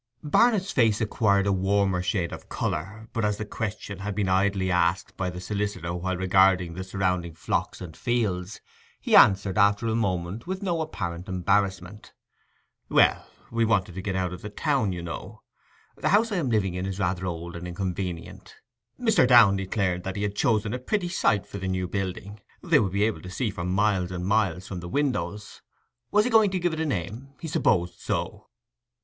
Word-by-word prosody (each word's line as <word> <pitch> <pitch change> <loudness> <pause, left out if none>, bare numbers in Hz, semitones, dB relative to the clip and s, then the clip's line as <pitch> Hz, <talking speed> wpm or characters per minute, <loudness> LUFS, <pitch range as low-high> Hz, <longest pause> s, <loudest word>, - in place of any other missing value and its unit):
Barnet's 195 +5 +3
face 115 -5 +3
acquired 105 -3 +2
a 100 - +2
warmer 95 -1 +1
shade 90 -2 -1
of - - -10
colour; 110 +8 -4
but 115 - -1
as 105 -1 +1
the 105 - -4
question 105 -2 -5
had 100 0 -4
been 100 -2 0
idly 95 0 +1
asked 90 +2 +1
by 90 -1 -2
the 90 0 -7
solicitor 100 -3 -3
while 90 +1 -2
regarding 95 -1 +3
the 95 +2 -5
surrounding 90 -3 -2
flocks 80 - -2
and 85 -4 -8
fields, 105 -6 -2 0.4
he - - +1
answered 95 0 +5
after 100 +2 +3
a 110 - 0
moment 95 - -2
with 190 +2 -4
no 170 -4 0
apparent 90 - -5
embarrassment— 95 +1 -1 0.8
'Well, - - +3 0.2
we 115 0 +1
wanted 105 -5 +1
to 95 - -5
get 95 -1 -3
out 90 -1 -1
of 90 - -8
the 105 - -6
town, 130 -1 0
you 90 -1 -5
know: 85 - -7 0.5
the - - -1
house 220 +3 +3
I 200 - 0
am 150 -7 0
living 100 -5 +1
in 90 +1 -3
is 95 -1 -4
rather 95 -1 -1
old 85 0 -5
and 85 +1 -6
inconvenient.' 90 -1 -5 0.4
Mr. 225 - +4
Downe 115 -6 +7
declared 95 -2 -1
that 95 +1 -4
he 100 - -2
had 100 -1 -2
chosen 110 0 +1
a 125 - -3
pretty 180 +7 -1
site 105 - +1
for 100 - -8
the 95 - -4
new 95 -1 -1
building. 95 +2 -4 0.2
They 170 -4 +4
would 100 -4 0
be 100 +1 +2
able 110 0 0
to 90 - -9
see 105 +5 -2
for 85 -3 -5
miles 95 -1 +1
and 90 -1 -4
miles 95 -3 +1
from 95 - -5
the 85 0 -7
windows. 105 -7 -2 0.5
Was 210 +1 +3
he 250 - 0
going 220 -2 +5
to 185 -1 -1
give 175 -1 0
it 160 - -4
a 160 - 0
name? 120 - -4
He 165 - -6
supposed 90 - +1
so. - - -3
100 Hz, 195 wpm, -26 LUFS, 90-110 Hz, 0.8 s, Downe